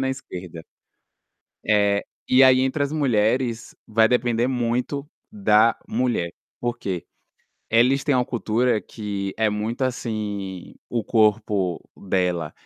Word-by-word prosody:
na 135 - 0
esquerda. 90 - -7 1.0
É, 100 -1 +3 0.3
e 130 +1 +6
aí 130 -1 +7
entre 130 +3 0
as 140 - -1
mulheres 120 -4 0
vai 110 0 +3
depender 120 -1 +1
muito 125 +3 -1 0.2
da 115 - +3
mulher. 115 -8 -1 0.3
Por 120 0 -2
quê? 95 -6 -4 0.7
Eles 125 +4 +4
têm 145 - +2
uma 125 -1 +2
cultura 120 -1 0
que 100 -1 -5
é 110 -1 +2
muito, 110 +5 -3
assim, 105 -7 -4
o 120 -2 -1
corpo 105 -5 +1 0.2
dela 90 -4 -1
115 Hz, 125 wpm, -23 LUFS, 100-125 Hz, 1.0 s, aí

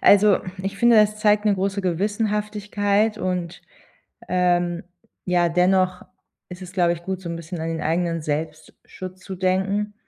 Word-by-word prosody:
Also, 205 0 +6 0.2
ich 195 0 -4
finde, 235 -1 +5
hm, 210 - +8
das 210 0 -5
zeigt 210 0 +3
'ne 210 -2 +3
große 195 +1 -1
Gewissenhaftigkeit 210 +2 0
und, 180 -2 -3 0.7
ähm, 175 -1 +1 0.4
ja, 175 -1 +2
dennoch 185 +1 +2 0.5
ist 180 +1 -9
es, 180 0 -9
glaube 175 -2 +2
ich 170 - -11
gut, 190 +1 -4
so 175 - -7
'n 170 - -4
bisschen 165 +1 -7
an 160 - -3
den 165 -1 -3
eigenen 165 0 0
„Selbstschutz“ 155 +4 -6
zu 190 0 -7
denken. 195 +3 0
185 Hz, 160 wpm, -23 LUFS, 175-205 Hz, 0.7 s, hm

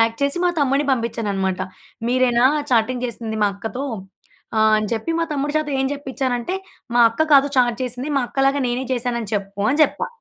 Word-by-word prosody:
Act 225 +2 0
చేసి 280 +4 +1
మా 355 - +4
తమ్ముడిని 280 0 +2
పంపించాననమాట. 205 -6 -1 0.5
మీరేనా 245 -1 +3 0.3
చాటింగ్ 245 +1 +2
చేసింది 225 -2 -5
మా - - +5
అక్కతో? 225 +7 -5 0.7
ఆహ్, 220 0 +4
అని 215 0 0
చెప్పి 230 +8 -2
మా 335 - +1
తమ్ముడు 290 0 -1
చేత 310 -1 0
ఏం 265 - +1
చెప్పించానంటే, 265 +1 -2 0.4
మా 240 - +5
అక్క 270 +8 0
కాదు 280 0 +6
చాట్ 240 -2 +3
చేసింది. 250 +2 -4
మా - - +3
అక్కలాగా 275 +1 +1
నేనే 245 +2 -1
చేశాను 245 -1 -1
అని 215 -3 -6
చెప్పు 200 0 -4
అని 290 +4 +1
చెప్పా. - - +1
245 Hz, 180 wpm, -21 LUFS, 225-275 Hz, 0.7 s, కాదు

